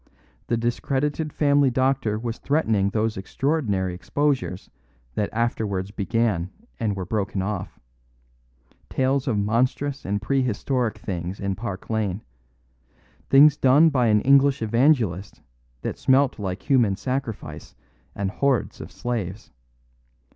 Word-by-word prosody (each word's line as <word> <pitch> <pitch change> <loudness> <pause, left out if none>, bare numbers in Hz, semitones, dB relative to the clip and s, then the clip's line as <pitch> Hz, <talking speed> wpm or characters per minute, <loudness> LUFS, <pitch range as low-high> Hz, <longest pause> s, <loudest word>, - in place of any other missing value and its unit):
The 120 - +1
discredited 140 +6 -1
family 145 -2 +3
doctor 130 -4 +1
was 115 +1 -4
threatening 110 -10 +1
those 110 0 -1
extraordinary 100 - -1
exposures 130 0 -2 0.4
that 105 - -1
afterwards 105 -4 -1
began 105 -4 0 0.3
and 110 -3 -1
were 95 -2 -4
broken 100 -1 -2
off; 100 -2 -4 1.1
tales 135 +1 0
of 115 -5 +1
monstrous 125 +7 0
and 100 +1 -1
prehistoric 125 -1 -1
things 90 -2 -5
in 100 -1 -1
Park 100 -2 -6
Lane; 105 -2 -1 1.1
things 145 +2 +7
done 145 +5 +5
by 125 -4 +2
an 105 -1 +4
English 140 -1 +4
Evangelist 110 - +1 0.4
that - - -4
smelt 135 -1 +3
like 95 -2 -4
human 120 -8 +3
sacrifice 125 0 -5 0.4
and 100 -2 -2
hordes 140 +2 0
of - - -9
slaves. 110 -4 -4
115 Hz, 120 wpm, -24 LUFS, 100-135 Hz, 1.1 s, things